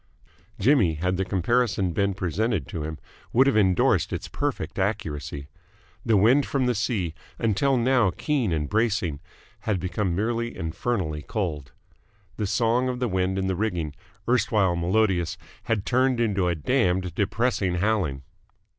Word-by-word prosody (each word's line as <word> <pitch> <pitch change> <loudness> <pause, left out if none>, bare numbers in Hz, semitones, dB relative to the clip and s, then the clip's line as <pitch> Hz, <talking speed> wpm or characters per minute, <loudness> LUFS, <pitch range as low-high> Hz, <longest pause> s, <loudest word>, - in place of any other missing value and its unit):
Jimmy, 105 - +4
had 90 +4 -1
the 95 - +1
comparison 100 0 +1
been 100 +2 0
presented 95 - -1
to 80 - -4
him, 80 0 -4 0.4
would 130 +3 +5
have 140 - +2
endorsed 95 -5 +3
its - - -4
perfect 85 +5 -3
accuracy. 75 -8 -3 0.6
The 110 -2 +3
wind 120 +9 +5
from 135 -2 0
the 125 - +2
sea, 105 -7 -1 0.2
until 120 +5 +2
now 120 -3 +3
keen 130 - -1
and 75 -3 -1
bracing, 105 -8 0 0.4
had 105 -4 -1
become 90 0 -1
merely 115 +4 -1
infernally 80 -2 -2
cold. 75 - -3 0.7
The 105 - -1
song 120 +4 +1
of 125 - -2
the 125 0 -1
wind 95 -1 0
in 95 - 0
the 95 -1 0
rigging, 90 -7 -2 0.3
erstwhile 105 -6 +2
melodious, 90 -1 +1 0.3
had 110 -3 -1
turned 130 0 +2
into 100 -6 +1
a 85 - +1
damned 90 - +1
depressing 100 -1 0
howling. 90 -8 0
100 Hz, 145 wpm, -25 LUFS, 90-115 Hz, 0.7 s, would